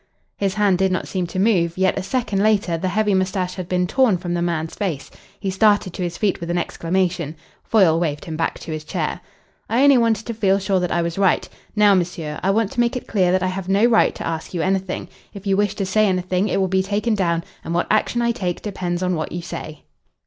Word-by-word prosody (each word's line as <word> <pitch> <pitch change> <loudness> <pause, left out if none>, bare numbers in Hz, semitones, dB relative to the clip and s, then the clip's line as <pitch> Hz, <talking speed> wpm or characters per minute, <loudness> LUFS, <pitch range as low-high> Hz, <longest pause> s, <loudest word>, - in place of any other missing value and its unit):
His 195 -1 -1
hand 200 -4 +2
did 190 -1 +2
not 185 - -2
seem 185 -2 -2
to 170 - -7
move, 185 -5 +2
yet 190 0 +2
a - - -2
second 200 -1 -1
later 205 -5 +2
the 175 +3 -2
heavy 210 +2 +1
moustache 185 -1 0
had 185 -1 -7
been 180 0 +1
torn 230 0 +3
from 175 0 -4
the 175 - -1
man's 165 -2 -2
face. 175 -9 -4 0.3
He 195 - -2
started 205 -2 +3
to - - -6
his 175 -1 -3
feet 205 -3 0
with 170 - -6
an 175 - 0
exclamation. 170 -2 -1 0.3
Foyle 180 -7 +4
waved 150 -4 -2
him 160 - -5
back 165 +1 -1
to - - -7
his 155 -1 -4
chair. - - -3 0.5
"I 240 +4 +3
only 280 -3 +6
wanted 225 -2 +1
to 235 - -3
feel 195 -3 +2
sure 195 -1 0
that 180 -2 -2
I 170 - +1
was 170 +2 -3
right. 190 -2 +2 0.3
Now, 210 -1 +5
monsieur, 170 -4 -2
I 190 - 0
want 210 +1 +1
to - - -5
make 240 +2 +2
it 250 - -4
clear 185 -4 +2
that 185 0 +2
I - - +1
have 185 0 -5
no 200 +4 +4
right 235 -2 +4
to - - -6
ask 165 +2 -4
you 165 - 0
anything. 190 0 -1 0.3
If 200 0 -9
you 195 -1 +2
wish 205 0 +1
to 195 - -2
say 215 +3 +3
anything, 185 +1 0
it - - 0
will 190 - +2
be 190 +1 +2
taken 205 +4 0
down, 170 -5 0 0.2
and 170 - -3
what 175 - +1
action 235 +2 +1
I 235 - +2
take 180 -6 -3
depends 180 -3 -3
on 180 0 +1
what 155 -2 -3
you 175 0 -5
say." 155 -2 -7
185 Hz, 250 wpm, -21 LUFS, 175-205 Hz, 0.5 s, only